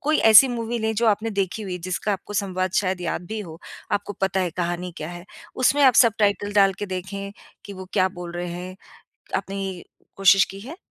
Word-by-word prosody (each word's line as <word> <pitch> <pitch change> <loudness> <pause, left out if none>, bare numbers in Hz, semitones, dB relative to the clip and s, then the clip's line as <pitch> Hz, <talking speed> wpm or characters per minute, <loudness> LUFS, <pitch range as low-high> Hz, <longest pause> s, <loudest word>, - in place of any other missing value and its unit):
कोई 305 +2 +1
ऐसी 235 +5 +9
मूवी 235 -1 -3
नहीं 220 0 -1
जो 235 - +2
आपने 215 +1 +1
देखी 200 +1 -2
हुई 185 -3 -5
जिसका 185 +4 -2
आपको 195 +2 -6
संवाद 185 -2 -1
शायद 185 -2 0
याद 175 0 -3
भी 220 +3 -4
हो, 165 -5 -9 0.3
आपको 205 0 -1
पता 195 0 +1
है 180 -2 -1
कहानी 175 +1 -3
क्या 155 - -6
है। 175 0 -9 0.3
उसमें 275 +3 +3
आप 260 -2 +6
सबटाइटल 205 -3 +3
डालके 200 0 +2
देखें 195 +2 -5 0.3
कि 200 - -8
वो 190 -1 -8
क्या 185 -2 +3
बोल 175 -2 -8
रहे 175 0 -4
हैं, 180 +1 -7 0.6
आपने 195 +1 -4
ये 190 -2 -6 0.3
कोशिश 195 0 +6
की 195 - -9
है? 270 +11 -9
195 Hz, 205 wpm, -23 LUFS, 180-215 Hz, 0.6 s, ऐसी